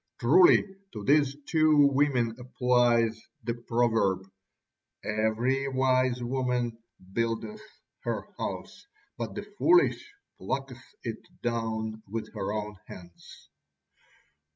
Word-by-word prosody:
Truly 170 +10 +6 0.3
to 105 - -6
these 140 +2 +3
two 155 -3 +5
women 130 -5 +2
applies 120 -3 +2 0.2
the 115 - -1
proverb: 115 -5 0 0.8
"Every 110 +6 0
wise 130 -2 +1
woman 125 -2 -1 0.3
buildeth 115 - -2 0.4
her - - -3
house: - - -6 0.3
but - - -5
the - - -4 0.2
foolish 350 +4 +3 0.3
plucketh - - -4 0.2
it - - -4 0.2
down 110 -2 -2
with 110 +2 -5
her 95 - -3
own 105 -1 -4
hands." 85 -1 -13
120 Hz, 100 wpm, -28 LUFS, 110-135 Hz, 0.8 s, Truly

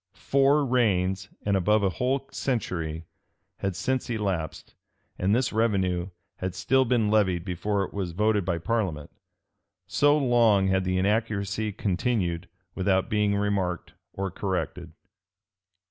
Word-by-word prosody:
[*] 95 - -55
Four 140 +2 +3
reigns, 100 -6 +1 0.2
and 100 -1 +2
above 105 +3 +2
a 95 - +3
whole 130 - -1
century, 85 - -2 0.5
had 95 -2 -2
since 130 +8 -1
elapsed; 95 -9 -3 0.5
and 100 +4 +2
this 125 -1 0
revenue 95 -5 +1 0.3
had 95 0 -4
still 130 +7 +2
been 115 -4 +2
levied 95 -6 +2
before 100 +3 -1
it - - -7
was 95 -4 -3
voted 105 +2 +2
by 85 -1 -1
parliament: 90 -6 -2 0.7
so 145 +1 +3
long 115 -8 +3
had 95 0 +1
the 95 0 0
inaccuracy 105 +1 0
continued, 95 -4 -1 0.2
without 95 0 +1
being 105 -1 +2
remarked 100 -4 -1 0.2
or 95 -1 -3
corrected. 90 -3 -3
100 Hz, 130 wpm, -26 LUFS, 95-115 Hz, 0.7 s, Four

